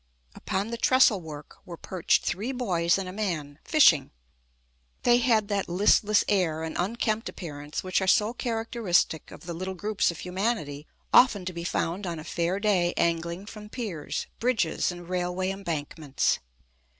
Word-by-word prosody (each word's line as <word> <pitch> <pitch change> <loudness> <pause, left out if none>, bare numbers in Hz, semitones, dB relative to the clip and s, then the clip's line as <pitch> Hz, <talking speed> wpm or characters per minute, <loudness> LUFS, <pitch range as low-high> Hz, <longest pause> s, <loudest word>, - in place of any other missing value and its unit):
Upon 200 +4 -3
the 235 - -4
trestlework 180 - +2
were 170 -2 -9
perched 185 0 0
three 210 +8 -2
boys 185 -10 +1
and 195 -1 -4
a 185 - -6
man, 160 -8 -3
fishing. 170 - +5 0.9
They 240 0 +5
had 225 -4 +2
that 200 -3 -1
listless 205 +3 +4
air 170 -6 +1
and 160 - -5
unkempt 220 +3 -1
appearance 145 -4 -6
which 185 +1 0
are 190 - -1
so 210 +4 +3
characteristic 225 -9 0
of - - -12
the 175 -1 -6
little 185 +3 -4
groups 205 +2 0
of 170 - -5
humanity 180 -6 -2 0.3
often 205 -7 +6
to 185 - -4
be 170 0 -5
found 175 +3 -2
on 170 -1 -3
a 155 - -7
fair 175 +4 -1
day 190 -5 +2
angling 170 +2 0
from 210 0 -10
piers, 210 - -4
bridges, 225 -9 +1
and 175 -1 -10
railway 180 +1 -1
embankments. 160 -6 -2
185 Hz, 155 wpm, -27 LUFS, 170-215 Hz, 0.9 s, often